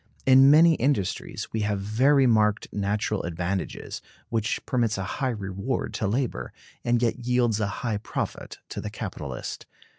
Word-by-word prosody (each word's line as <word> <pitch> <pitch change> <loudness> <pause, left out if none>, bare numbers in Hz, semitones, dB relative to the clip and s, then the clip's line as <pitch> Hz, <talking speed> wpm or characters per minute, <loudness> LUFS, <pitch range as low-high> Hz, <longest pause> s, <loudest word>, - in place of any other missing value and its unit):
In 135 +1 +7
many 165 +3 +7
industries 130 - -1
we 110 - 0
have 105 -1 0
very 130 +8 +3
marked 110 -3 +3
natural 105 +1 -1
advantages, 90 +3 -4 0.3
which 115 0 -1
permits 120 -6 +1
a 95 - -2 0.2
high 130 - +2
reward 100 +2 -3
to 110 - -1
labor, 125 +4 -2 0.3
and 120 0 +2
yet 120 +1 +1
yields 120 -3 +1
a 105 - +1 0.2
high 115 -4 0
profit - - -5
to - - -5
the - - -4
capitalist. - - -6
110 Hz, 150 wpm, -26 LUFS, 105-125 Hz, 0.3 s, In